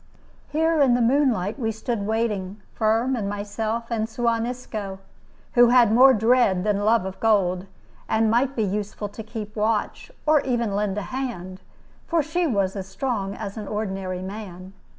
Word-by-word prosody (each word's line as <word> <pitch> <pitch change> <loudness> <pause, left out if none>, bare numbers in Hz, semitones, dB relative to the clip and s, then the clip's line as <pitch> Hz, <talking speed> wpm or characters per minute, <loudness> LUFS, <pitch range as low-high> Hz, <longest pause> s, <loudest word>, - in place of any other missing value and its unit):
Here, 320 +1 +2
in 255 -3 +5
the - - +1
moonlight, 235 -4 +2
we 225 -3 0
stood 220 -1 -3
waiting, 215 -3 -1
Firm 225 +4 +1
and 205 -4 -2
myself 215 +3 -3
and 220 -1 -1
Suan 230 0 0
Isco, 215 -6 -5 0.6
who 245 -1 +7
had 240 -3 +5
more 260 +3 +8
dread 225 -5 +3
than 205 -1 +1
love 220 -2 +3
of 190 0 -6
gold, 195 -4 +2 0.4
and 220 0 +2
might 260 +4 +2
be 225 - +1
useful 205 +1 -3
to 220 - -8
keep 215 -1 -7
watch, 220 - -1
or 305 -1 +4
even 240 -4 0
to 200 - -3
lend 205 -1 -1
a 205 - -2
hand, 190 -9 -5 0.5
for 330 -2 +2
she 335 +4 0
was 200 -7 0
as 190 -1 -5
strong 200 -3 -3
as 200 -1 -6
an 210 -2 -6
ordinary 190 -3 -3
man. 190 -2 -8
220 Hz, 170 wpm, -24 LUFS, 200-240 Hz, 0.6 s, more